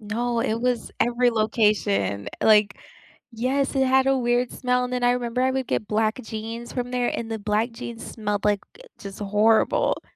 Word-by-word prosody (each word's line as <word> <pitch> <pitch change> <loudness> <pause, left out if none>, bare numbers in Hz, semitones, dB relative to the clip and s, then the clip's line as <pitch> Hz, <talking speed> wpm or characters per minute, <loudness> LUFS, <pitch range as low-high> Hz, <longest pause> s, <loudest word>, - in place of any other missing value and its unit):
No, 230 +3 -2
it 225 0 -1
was 245 -1 -1
every 245 +1 +3
location, 210 - +1
like 210 -2 +4 0.6
Yes, 265 +5 -1
it 265 0 +3
had 265 +1 +3
a 270 0 +3
weird 240 0 +1
smell, 250 0 0
and 250 - -5
then 250 0 -2
I 245 - +5
remember 245 0 -1
I 260 - +3
would 260 -1 -2
get 215 - -1
black 215 0 +1
jeans 225 +1 -6
from 245 -1 -3
there, 250 -1 0
and 225 -1 -4
the 225 - -3
black 215 +3 -1
jeans 230 0 -8
smelled, 210 -2 -3
like, 205 -1 +1
gu - - -18 0.2
just 195 0 -9
horrible. 210 +2 +2
230 Hz, 190 wpm, -24 LUFS, 215-250 Hz, 0.6 s, I